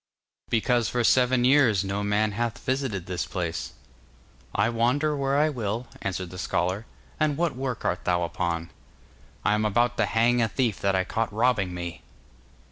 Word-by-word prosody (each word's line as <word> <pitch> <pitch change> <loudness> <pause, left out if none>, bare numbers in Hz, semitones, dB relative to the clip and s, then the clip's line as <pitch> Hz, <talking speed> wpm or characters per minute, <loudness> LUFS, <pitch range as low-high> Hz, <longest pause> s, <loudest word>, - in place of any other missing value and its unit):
'Because 120 0 +2
for 120 -1 0
seven 125 +1 +4
years 125 -8 +4
no 100 +1 -2
man 105 +1 +1
hath 115 +2 -2
visited 130 -9 -2
this 90 -2 -3
place.' 80 -8 -3 0.8
'I 105 +3 +3
wander 125 +6 +1
where 140 0 0
I 155 +2 +4
will,' 115 -3 -3 0.2
answered 95 -2 -3
the 90 - -8
scholar. 95 +6 -1 0.3
'And 150 -2 +1
what 170 -5 0
work 130 -3 -4
art 90 - -1
thou 90 -1 +2
upon?' 85 -1 -2 0.7
'I - - +4
am 105 0 +1
about 120 +3 +1
to - - +2
hang 120 +2 +3
a 115 - +3
thief 115 -1 -1
that 100 -1 +1
I 95 - +2
caught 110 +4 -2
robbing 105 -5 +1
me! 85 -1 -6
110 Hz, 170 wpm, -26 LUFS, 95-125 Hz, 0.8 s, seven